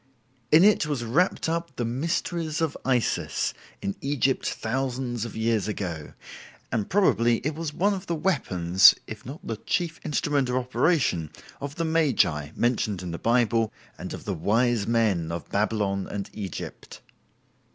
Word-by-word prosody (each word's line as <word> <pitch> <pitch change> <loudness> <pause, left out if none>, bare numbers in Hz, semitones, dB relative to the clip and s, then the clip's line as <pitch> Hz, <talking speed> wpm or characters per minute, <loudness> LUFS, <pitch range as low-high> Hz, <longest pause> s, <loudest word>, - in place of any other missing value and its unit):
In 160 +3 +7
it 205 -6 +4
was 140 -5 -2
wrapped 160 +13 +1
up 170 +1 -2
the 120 - -2
"mysteries 160 +5 -2
of 160 -3 0
Isis" 125 -3 0 0.3
in 100 - -2
Egypt 135 -2 +1
thousands 125 -1 -2
of 115 - -8
years 110 -2 +1
ago, 85 -7 -4 0.6
and 110 -4 -1
probably 120 - +3
it 155 - 0
was 160 0 -4
one 200 +6 +1
of 195 -1 -6
the 170 - 0
weapons, 95 - +5
if 110 +1 -9
not 140 +4 -9
the 115 - -3
chief 165 +7 -2
instrument 145 -3 0
of 125 - 0
operation, 125 - +1 0.3
of 140 +1 -6
the 165 - -1
magi 135 - +2
mentioned 110 -6 0
in 90 - -4
the 85 - -5
Bible 115 -2 +2 0.3
and - - -6
of - - -7
the 100 - -1
"wise 110 +5 +1
men" 105 -8 +1
of 85 - -5
Babylon 100 -2 0
and 100 -1 -5
Egypt. 100 -5 -7
120 Hz, 155 wpm, -26 LUFS, 105-150 Hz, 0.6 s, In